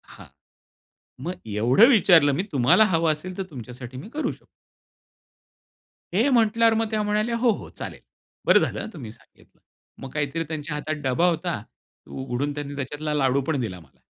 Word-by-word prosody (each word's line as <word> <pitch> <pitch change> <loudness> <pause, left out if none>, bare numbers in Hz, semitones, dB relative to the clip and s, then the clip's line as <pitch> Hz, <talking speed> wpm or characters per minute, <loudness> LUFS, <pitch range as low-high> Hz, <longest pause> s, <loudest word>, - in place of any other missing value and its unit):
हां, - - -13 1.0
मग 180 +2 -3
एवढं 120 - +5
विचारलं 175 - +6
मी 180 - -1
"तुम्हाला 135 - +5
हवं 165 -1 +3
असेल 180 +5 -5
तर 195 - -2
तुमच्यासाठी 125 -1 -9
मी 150 - -9
करू 305 +4 -2
शकतो." - - -15 1.7
हे 230 +9 +3
म्हटल्यावर 230 -2 +4
मग 225 0 0
त्या 215 - 0
म्हणाल्या, 215 +3 0
"हो, 240 0 +2
हो, - - -10
चालेल, - - -8 0.5
बरं - - +6
झालं - - -2
हं, - - -5
तुम्ही 120 - -8
सांगितलं." - - -22 0.4
मग 135 - -6
काहीतरी 150 +2 -1
त्यांच्या 155 -1 -4
हातात 155 +1 -3
डबा 135 +7 +2
होता. 170 - -2 0.5
उघडून 135 +2 -3
त्यांनी 145 -1 -6
त्याच्यातला 150 +2 -4
लाडू 135 -1 +2
पण 155 -4 0
दिला 95 -6 -4
मला. 75 -5 -22
150 Hz, 165 wpm, -24 LUFS, 130-200 Hz, 1.7 s, विचारलं